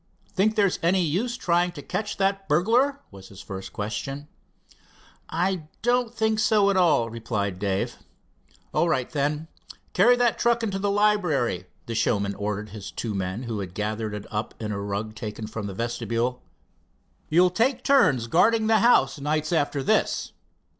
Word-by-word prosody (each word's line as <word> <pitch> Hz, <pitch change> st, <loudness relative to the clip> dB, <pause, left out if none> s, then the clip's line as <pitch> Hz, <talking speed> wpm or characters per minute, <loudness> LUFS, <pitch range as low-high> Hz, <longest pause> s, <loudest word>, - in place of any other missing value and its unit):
"Think 215 Hz, +3 st, +2 dB
there's 200 Hz, -4 st, +2 dB
any 180 Hz, +2 st, +3 dB
use 210 Hz, +10 st, -1 dB
trying 175 Hz, -4 st, +1 dB
to 145 Hz, -4 st, -9 dB
catch 210 Hz, 0 st, -3 dB
that 195 Hz, -1 st, 0 dB
burglar?" 240 Hz, -, +2 dB
was 95 Hz, -1 st, -12 dB
his 95 Hz, -, -13 dB
first 95 Hz, -2 st, -7 dB
question. 135 Hz, +7 st, -4 dB, 1.0 s
"I 175 Hz, -1 st, -1 dB, 0.2 s
don't 245 Hz, -1 st, +2 dB
think 220 Hz, -2 st, 0 dB
so 210 Hz, -2 st, +4 dB
at -, -, 0 dB
all," 160 Hz, -11 st, +3 dB
replied 105 Hz, -5 st, -3 dB
Dave. 100 Hz, -1 st, -1 dB, 0.8 s
"All 170 Hz, -, +2 dB
right, 130 Hz, -6 st, +1 dB
then. 150 Hz, +1 st, -1 dB, 0.5 s
Carry 245 Hz, +1 st, +5 dB
that 245 Hz, -2 st, +1 dB
truck 235 Hz, -1 st, +2 dB
into 195 Hz, -3 st, -1 dB
the 200 Hz, +1 st, 0 dB
library," 180 Hz, -, +1 dB, 0.2 s
the 115 Hz, -, -5 dB
showman 100 Hz, -3 st, +1 dB
ordered 105 Hz, +1 st, -4 dB
his 100 Hz, 0 st, -8 dB
two 110 Hz, -3 st, -4 dB
men, 95 Hz, +4 st, -3 dB
who 115 Hz, -3 st, -4 dB
had 95 Hz, -2 st, -6 dB
gathered 105 Hz, 0 st, -2 dB
it 105 Hz, 0 st, -7 dB
up 105 Hz, 0 st, -3 dB
in 110 Hz, -2 st, -4 dB
a 100 Hz, -1 st, -3 dB
rug 100 Hz, +2 st, -3 dB
taken 110 Hz, 0 st, -6 dB
from 105 Hz, -1 st, -5 dB
the 95 Hz, -, -6 dB
vestibule. 120 Hz, +2 st, -2 dB, 0.9 s
"You'll 180 Hz, +3 st, +4 dB
take 250 Hz, +6 st, +1 dB
turns 145 Hz, -, +4 dB
guarding 220 Hz, -, +3 dB
the 220 Hz, 0 st, +4 dB
house, 235 Hz, -8 st, +4 dB
nights 155 Hz, +4 st, -1 dB
after 145 Hz, -3 st, 0 dB
this. -, -, +1 dB
150 Hz, 165 wpm, -25 LUFS, -, 1.0 s, Carry